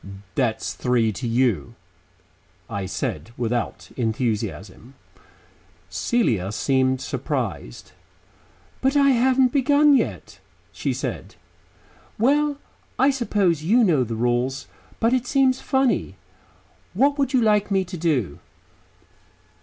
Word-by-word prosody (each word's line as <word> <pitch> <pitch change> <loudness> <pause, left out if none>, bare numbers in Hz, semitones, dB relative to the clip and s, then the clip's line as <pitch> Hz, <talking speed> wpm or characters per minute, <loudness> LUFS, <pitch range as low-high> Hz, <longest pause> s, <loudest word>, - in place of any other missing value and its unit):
"That's 115 -2 -1
three 120 -3 +1
to 120 +4 -5
you," 115 - 0 0.9
I 100 -1 -4
said 80 -3 -4
without 120 0 -3
enthusiasm. 110 -1 -3 1.0
Celia 105 - 0
seemed 130 +3 +1
surprised. - - -4 0.9
"But 270 +2 +2
I 275 -1 +5
haven't 255 +1 +3
begun 285 +1 +4
yet," - - -2 0.3
she - - -3
said. - - -5 0.8
"Well, 285 +5 +2 0.4
I 275 +2 +4
suppose 205 - 0
you 220 +10 +3
know 160 - +3
the 115 -1 -4
rules, 120 +3 -1 0.3
but 230 +2 +2
it 250 -1 0
seems 265 -2 +2
funny. 265 -2 0 0.8
What 285 +1 +2
would 275 -2 +1
you 260 -3 +3
like 210 -2 +2
me 195 -2 +1
to 180 +1 -8
do?" 145 - -1
165 Hz, 110 wpm, -23 LUFS, -, 1.0 s, I